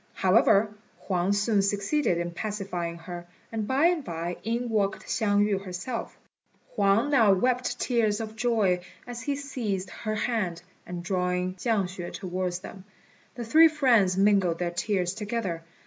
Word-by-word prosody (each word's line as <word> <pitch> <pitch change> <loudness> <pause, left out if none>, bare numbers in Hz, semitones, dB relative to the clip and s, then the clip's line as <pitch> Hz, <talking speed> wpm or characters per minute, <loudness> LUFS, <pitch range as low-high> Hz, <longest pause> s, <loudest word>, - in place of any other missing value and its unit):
However, 205 +2 +4 0.3
Huang 185 0 +1
soon 205 +1 +2
succeeded 200 - +1
in 175 0 -2
pacifying 180 -4 -4
her, 175 +1 -8 0.2
and 220 -2 -3
by 270 +4 +2
and 345 -3 +2
by 170 -3 -4
in 235 +3 -1
walked 205 -3 0
Hsiang 205 -2 +2
yü 200 -2 -1
herself. 190 +6 -5 0.6
Huang 205 +7 +2
now 230 -7 +5
wept 250 +5 0
tears 225 -4 +1
of 220 -1 -6
joy 220 -6 +2 0.3
as 240 -1 -7
he 280 +4 -1
seized 215 -10 -3
her 215 -1 -4
hand, 190 -7 -1 0.2
and 175 -1 -6
drawing 180 -1 -1
Chiang 210 +2 0
hsüeh 180 -1 -6
towards 185 -1 -3
them, 190 0 -10 0.5
the 240 - -5
three 320 +8 +7
friends 235 - +3
mingled 195 -4 +3
their 175 0 -2
tears 180 0 -1
together. 210 -5 -3
200 Hz, 150 wpm, -27 LUFS, 180-230 Hz, 0.6 s, three